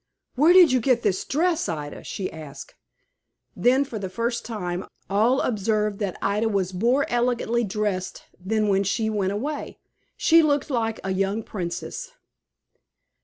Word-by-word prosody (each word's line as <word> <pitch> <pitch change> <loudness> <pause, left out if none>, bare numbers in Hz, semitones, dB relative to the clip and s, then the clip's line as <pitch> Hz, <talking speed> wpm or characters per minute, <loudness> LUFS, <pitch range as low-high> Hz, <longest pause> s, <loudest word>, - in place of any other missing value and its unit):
"Where 300 +7 +5
did 360 -4 +8
you 255 - +3
get 245 0 +1
this 195 -4 +1
dress, 335 +3 0
Ida?" 150 -3 -5
she 190 - -5
asked. 155 -3 -10 0.8
Then, 260 +3 +3
for 230 -5 -6
the 190 -2 -4
first 235 +4 -2
time, 180 -5 -4 0.2
all 225 +7 +3
observed 210 -2 0
that 200 -4 -3
Ida 210 +3 +1
was 190 -3 -1
more 240 +9 +2
elegantly 240 -1 0
dressed 205 -3 -3 0.2
than 215 +2 0
when 195 -1 +3
she 220 +3 0
went 200 -3 0
away. 285 +8 -4 0.4
She 330 0 +5
looked 290 -1 +1
like 225 -3 -1
a 190 - -1
young 195 +3 -1
princess. 210 - -5
220 Hz, 150 wpm, -24 LUFS, 195-250 Hz, 0.8 s, did